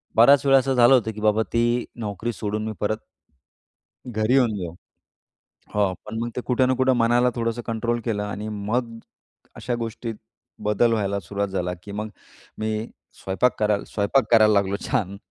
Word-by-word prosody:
बराच 135 +5 +6
वेळा 135 -1 +6
असं 135 0 +1
झालं 120 +1 +6
होतं 115 -4 +3
,की 105 - -7
बाबा 110 +1 +3
ती 115 - +3 0.4
नोकरी 110 +1 -3
सोडून 105 0 -3
मी - - -2
परत 105 +1 0 1.1
घरी 110 -1 0
येऊन 125 -5 +3
जाऊ. 85 -4 -5 1.0
हो 100 -3 +2
पण 110 +1 -5
मग 120 - -2
ते - - -1
कुठे 130 0 +2
ना 130 - +2
कुठे 130 +1 +3
मनाला 120 +1 +3
थोडंसं 115 0 -2
कंट्रोल 115 +1 -1
केलं 105 -3 -1
आणि 105 +1 -5
मग 115 +3 -3 0.6
अशा 120 - -3
गोष्टीत 115 0 -4 0.5
बदल 110 +3 +3
व्हायला 100 -2 0
सुरुवात 100 +3 -3
झाला, 90 -2 -2
की 100 - -9
मग 105 +1 -4 0.5
मी 110 0 -2 0.3
स्वयंपाक 100 +6 0
करायला 105 -1 +1
स्वयंपाक 110 +5 +1
करायला 110 -2 +6
लागलो 100 -1 +2
छान 100 -1 -1
110 Hz, 170 wpm, -23 LUFS, 105-120 Hz, 1.1 s, बराच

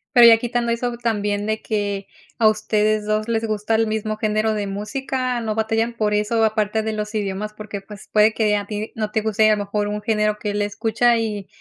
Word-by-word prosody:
Pero 240 -1 +9
ya 230 -1 +9
quitando 235 0 -1
eso 245 +1 -1
también 205 -3 -1
de 220 0 -1
que 205 -2 -2 0.3
a 220 - +5
ustedes 215 0 +1
dos 215 +1 0
les 225 -1 0
gusta 215 +1 -1
el 225 0 +3
mismo 215 0 -2
género 215 0 +1
de 205 -1 -2
música, 250 +5 -2
no 220 -1 -2
batallan 225 +1 0
por 215 -2 0
eso, 225 +2 +1
aparte 220 0 +1
de 220 0 -2
los 210 0 -4
idiomas, 210 0 -3
porque, 210 -2 -7
pues, 205 0 -12
puede 215 +1 +5
que 215 -2 +2
a 205 - -3
ti 210 +1 -5
no 215 -1 -3
te 220 - 0
guste 220 0 +2
a 215 - +4
lo 205 -1 -3
mejor 205 +1 -1
un 210 0 -3
género 210 -1 +1
que 210 -1 -2
él 205 - -1
escucha, 225 +3 +1
y 210 -3 -3
215 Hz, 220 wpm, -21 LUFS, 210-225 Hz, 0.3 s, Pero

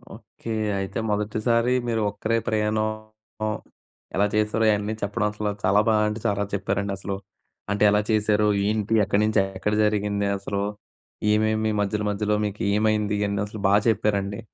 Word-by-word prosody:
Okay. 115 - -8 0.3
అయితే 95 +2 -3
మొదటిసారి 110 +4 +1
మీరు 115 -2 0
ఒక్కరే 110 +3 -1
ప్రయాణం 110 0 +1 1.3
ఎలా 100 - +3
చేసారో 105 +1 +1
ఇవన్నీ 105 +1 -1
చెప్పడం 105 +2 -1
అసలు 105 0 -3
చాలా 95 +2 +4
బాగా 105 -1 +3
అంటే 105 +1 -4
చాలా 100 -1 0
చెప్పారండి 100 0 -1
అసలు. 100 +1 -4 0.6
అంటే 105 +1 +1
ఎలా 105 0 +3
చేశారు 105 0 +2 0.2
ఏంటి? 105 0 0
ఎక్కడి 100 +1 +1
నుంచి 110 -1 +2 0.2
ఎక్కడ 105 +2 -1
జరిగింది. 105 -1 0
అసలు 100 0 -3 0.7
ఏమేమి 110 0 +2
మధ్యలో, 105 +1 0
మధ్యలో 105 +1 0
మీకు 105 0 -4 0.2
ఏమైంది 105 -1 +1
ఇయన్నీ 100 -1 -1
అసలు 105 +1 -8
బా 100 - +3
చెప్పారండి. 100 -2 +1
105 Hz, 145 wpm, -24 LUFS, 100-110 Hz, 1.3 s, చాలా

